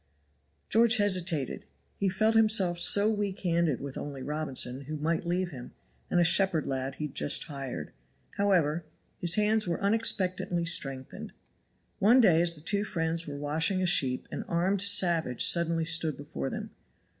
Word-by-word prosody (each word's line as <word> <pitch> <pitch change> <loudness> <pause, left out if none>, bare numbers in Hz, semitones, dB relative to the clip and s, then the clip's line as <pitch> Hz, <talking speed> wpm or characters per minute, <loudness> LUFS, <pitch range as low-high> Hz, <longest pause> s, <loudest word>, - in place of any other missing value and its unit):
George 230 +2 +4
hesitated. 180 - 0 0.3
He 200 - -1
felt 215 +4 +1
himself 215 -6 +3
so 200 +4 +5
weak 205 -3 -2
handed 170 -6 0
with 140 -1 -7
only 140 -2 -7
Robinson, 140 -3 -4
who 155 +2 -6
might 165 +3 -2
leave 180 +1 -2
him, 125 -4 -10 0.4
and 175 - +1
a - - +4
shepherd 170 -1 +3
lad 135 0 -4
he 150 - -5
had 150 - -8
just 145 - +2
hired. 135 - -7 0.4
However 175 -6 0 0.4
his 170 -1 +1
hands 210 0 +1
were 170 - -2
unexpectedly 190 -4 -1
strengthened. 135 -5 -2 0.7
One 235 +6 +5
day 175 -9 +4
as 170 -1 +3
the 150 - -10
two 200 +5 -1
friends 165 -4 -3
were 145 -1 -6
washing 160 +6 0
a - - +1
sheep 130 -7 +1
an - - -5
armed 180 +3 0
savage 175 -10 +2
suddenly 165 -1 +2
stood 160 -3 +1
before 70 - -6
them. - - -7
170 Hz, 160 wpm, -28 LUFS, 150-195 Hz, 0.7 s, so